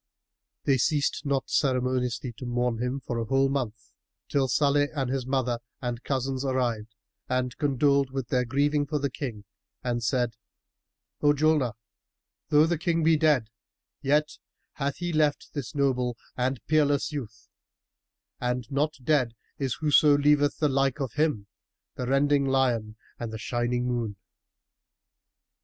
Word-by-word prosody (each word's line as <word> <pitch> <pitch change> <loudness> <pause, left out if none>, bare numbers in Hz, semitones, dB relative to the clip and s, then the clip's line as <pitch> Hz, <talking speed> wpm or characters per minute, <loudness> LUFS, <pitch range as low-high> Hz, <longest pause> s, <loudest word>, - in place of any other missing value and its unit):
They 135 -2 +2
ceased 145 +1 +1
not 135 -1 0
ceremonially 125 -2 0
to 125 - -6
mourn 120 -1 0 0.2
for 120 - -4
him - - 0
a - - -2
whole 135 +3 +2
month, 120 -6 -3 0.4
till 135 -2 +2
Salih 145 +2 +3
and 135 -3 -1
his 130 -2 -2
mother 130 -3 0 0.2
and 120 -1 -4
cousins 135 -1 -1
arrived 120 -5 -1 0.3
and 125 -1 -1
condoled 140 -1 +2
with 130 -2 -4
their 125 -1 +2
grieving 145 +3 +1
for 150 - -1
the 140 -2 -1
King 115 -8 -5 0.4
and 120 -1 -1
said, 120 +1 0 0.8
"O 145 0 +5
Julnar, 145 -5 +2 0.8
though 150 +1 +6
the 165 -1 0
King 165 -1 +1
be 160 0 +5
dead, 150 -8 +2 0.5
yet 150 +2 +1 0.3
hath 140 -1 -2
he 175 -1 -3
left 150 -2 +1
this 140 -5 -5
noble 125 -4 +1 0.2
and 130 -1 -1
peerless 145 -1 +2
youth, 110 -8 -7 0.9
and 125 0 -1
not 150 +3 +1
dead 130 -5 +2 0.2
is 135 -3 -1
whoso 150 -1 +5
leaveth 145 0 +3
the 150 - +2
like 135 0 +1
of 135 -5 -3
him, 150 -10 0 0.5
the 125 - -4
rending 140 +1 +3
lion 120 -5 +1 0.2
and 115 -2 -4
the 110 - -5
shining 120 +1 -1
moon." 120 -4 -2
135 Hz, 145 wpm, -27 LUFS, 125-145 Hz, 0.9 s, though